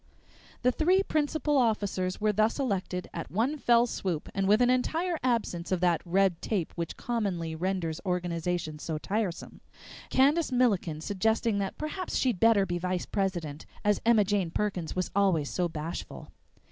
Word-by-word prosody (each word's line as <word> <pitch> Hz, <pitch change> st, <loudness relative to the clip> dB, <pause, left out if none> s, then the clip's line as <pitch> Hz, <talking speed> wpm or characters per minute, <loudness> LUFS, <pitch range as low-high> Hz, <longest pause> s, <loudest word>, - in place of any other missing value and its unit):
The 250 Hz, -, +4 dB
three 365 Hz, +8 st, +3 dB
principal 300 Hz, -3 st, 0 dB
officers 205 Hz, -6 st, 0 dB
were 215 Hz, 0 st, +2 dB
thus 215 Hz, +2 st, +2 dB
elected 195 Hz, -8 st, -2 dB
at 165 Hz, -, -5 dB
one 250 Hz, -, 0 dB
fell 240 Hz, -2 st, +4 dB
swoop 185 Hz, -9 st, -3 dB
and 195 Hz, -1 st, 0 dB
with 210 Hz, +2 st, +5 dB
an 245 Hz, 0 st, +4 dB
entire 325 Hz, +7 st, 0 dB
absence 230 Hz, -9 st, -1 dB
of 185 Hz, -, +1 dB
that 175 Hz, -3 st, +2 dB
red 185 Hz, 0 st, +2 dB
tape 195 Hz, -7 st, -2 dB
which 170 Hz, -1 st, -5 dB
commonly 195 Hz, -9 st, -2 dB
renders 170 Hz, -1 st, -2 dB
organization 175 Hz, -3 st, -2 dB
so 160 Hz, 0 st, -3 dB
tiresome, 195 Hz, +1 st, -3 dB, 0.5 s
Candace 290 Hz, +4 st, +3 dB
Milliken 200 Hz, -11 st, +1 dB
suggesting 220 Hz, +3 st, 0 dB
that 195 Hz, -1 st, -3 dB
perhaps 330 Hz, +5 st, -4 dB
she'd 245 Hz, -8 st, +1 dB
better 220 Hz, -2 st, +5 dB
be 175 Hz, -1 st, -2 dB
vice 180 Hz, 0 st, -2 dB
president, 175 Hz, -7 st, -3 dB, 0.2 s
as 210 Hz, -1 st, +2 dB
Emma 225 Hz, -2 st, +5 dB
Jane 200 Hz, -3 st, 0 dB
Perkins 180 Hz, -2 st, -2 dB
was 185 Hz, -1 st, -2 dB
always 185 Hz, -8 st, +2 dB
so 180 Hz, -1 st, 0 dB
bashful. 160 Hz, +2 st, -6 dB
195 Hz, 160 wpm, -29 LUFS, 175-235 Hz, 0.5 s, with